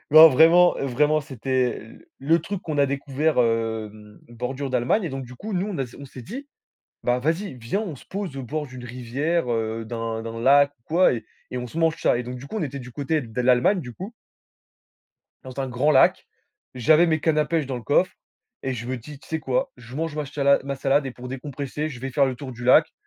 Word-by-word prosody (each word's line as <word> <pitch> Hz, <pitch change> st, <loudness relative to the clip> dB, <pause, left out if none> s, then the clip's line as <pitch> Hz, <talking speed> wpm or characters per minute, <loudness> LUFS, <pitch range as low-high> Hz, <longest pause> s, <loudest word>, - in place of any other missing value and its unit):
Non, 160 Hz, +1 st, +11 dB
vraiment 165 Hz, +5 st, +6 dB
vraiment, 150 Hz, +4 st, +2 dB
c'était 130 Hz, -2 st, -1 dB
l 110 Hz, -, -14 dB
le 160 Hz, +5 st, +3 dB
truc 190 Hz, +3 st, -5 dB
qu'on 155 Hz, -3 st, -3 dB
a 140 Hz, -, +5 dB
découvert, 140 Hz, +2 st, -1 dB
hem, 110 Hz, -3 st, -1 dB
bordure 130 Hz, +3 st, -4 dB
d'Allemagne 130 Hz, -, +1 dB
et -, -, -1 dB
donc 135 Hz, -2 st, -5 dB
du 125 Hz, +1 st, -11 dB
coup, 215 Hz, -, -7 dB
nous 185 Hz, +1 st, 0 dB
on 185 Hz, -8 st, -4 dB
a -, -, +1 dB
s 120 Hz, -, -13 dB
on 140 Hz, -, -9 dB
s'est 130 Hz, -1 st, -10 dB
dit: 265 Hz, -, -8 dB, 0.6 s
«Bah, 125 Hz, 0 st, +2 dB
vas-y, 165 Hz, +3 st, -1 dB
viens, 120 Hz, -, -2 dB
on 195 Hz, -8 st, -4 dB
se -, -, -16 dB
pose 195 Hz, -7 st, -5 dB
au 135 Hz, -, -4 dB
bord 150 Hz, +5 st, -3 dB
d'une 130 Hz, -2 st, -10 dB
rivière, 125 Hz, +5 st, -2 dB
heu, 115 Hz, 0 st, -2 dB
d'un 115 Hz, -1 st, -4 dB
d'un 115 Hz, 0 st, -6 dB
lac 140 Hz, +3 st, +5 dB
ou -, -, -42 dB
quoi, 175 Hz, 0 st, +4 dB
et 115 Hz, -, -4 dB, 0.3 s
et 125 Hz, -, -3 dB
on 125 Hz, -, -4 dB
se 140 Hz, +7 st, -7 dB
mange 165 Hz, 0 st, +2 dB
ça» 120 Hz, -, +3 dB
et -, -, -2 dB
donc 125 Hz, +1 st, -6 dB
du 130 Hz, +3 st, -9 dB
coup, 220 Hz, -, -6 dB
on -, -, -2 dB
était 140 Hz, -1 st, -4 dB
du 125 Hz, 0 st, -10 dB
côté 150 Hz, +3 st, -1 dB
de 115 Hz, +1 st, -5 dB
l'Allemagne, 125 Hz, +10 st, +3 dB
du 125 Hz, -6 st, -8 dB
coup 195 Hz, -, -7 dB, 1.3 s
dans 130 Hz, +1 st, -6 dB
un 135 Hz, -, -2 dB
grand 130 Hz, +5 st, +1 dB
lac, 135 Hz, -, +4 dB, 0.5 s
j'avais 155 Hz, +8 st, +5 dB
mes 160 Hz, -2 st, +1 dB
cannes 155 Hz, -1 st, +2 dB
à 150 Hz, -, +3 dB
pêche 160 Hz, -2 st, -1 dB
dans 130 Hz, -1 st, -3 dB
le 120 Hz, -, -7 dB
coffre 145 Hz, +9 st, +2 dB, 0.5 s
et 135 Hz, -, -2 dB
je 120 Hz, 0 st, -6 dB
me 130 Hz, +1 st, -2 dB
dis: 140 Hz, +4 st, -10 dB
«Tu -, -, -18 dB
sais 160 Hz, -1 st, -2 dB
quoi? 130 Hz, -3 st, -1 dB
Je 125 Hz, 0 st, -12 dB
mange 160 Hz, -1 st, -2 dB
ma 150 Hz, -, -1 dB
chala 140 Hz, 0 st, +2 dB
ma 140 Hz, 0 st, -3 dB
salade 140 Hz, +1 st, +2 dB
et -, -, -3 dB
pour 125 Hz, +1 st, -9 dB
décompresser, 140 Hz, +3 st, -4 dB
je 130 Hz, -6 st, -9 dB
vais 135 Hz, +1 st, -4 dB
faire 140 Hz, +1 st, +3 dB
le 130 Hz, -, -3 dB
tour 130 Hz, 0 st, -7 dB
du 120 Hz, 0 st, -9 dB
lac». 125 Hz, -, +5 dB
135 Hz, 240 wpm, -24 LUFS, 125-155 Hz, 1.3 s, Non